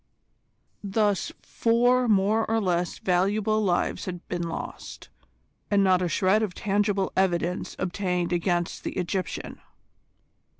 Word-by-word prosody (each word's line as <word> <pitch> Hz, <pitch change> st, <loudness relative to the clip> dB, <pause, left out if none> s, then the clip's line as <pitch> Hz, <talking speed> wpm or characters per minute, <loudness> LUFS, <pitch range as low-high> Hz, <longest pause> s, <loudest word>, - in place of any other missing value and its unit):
Thus 205 Hz, -1 st, 0 dB
four 240 Hz, +10 st, +2 dB
more 215 Hz, +1 st, +2 dB
or 225 Hz, 0 st, +2 dB
less 180 Hz, -3 st, -1 dB
valuable 205 Hz, +4 st, +1 dB
lives 180 Hz, -4 st, 0 dB
had 180 Hz, -1 st, -7 dB
been 175 Hz, -1 st, -3 dB
lost, -, -, -7 dB, 0.6 s
and 200 Hz, -1 st, +3 dB
not 185 Hz, -1 st, +4 dB
a 180 Hz, -, 0 dB
shred 190 Hz, +4 st, +2 dB
of 210 Hz, -5 st, -2 dB
tangible 200 Hz, -1 st, 0 dB
evidence 180 Hz, -1 st, 0 dB
obtained 180 Hz, -1 st, -1 dB
against 175 Hz, 0 st, -1 dB
the -, -, -4 dB
Egyptian. 185 Hz, -1 st, -3 dB
190 Hz, 120 wpm, -26 LUFS, 180-210 Hz, 0.6 s, not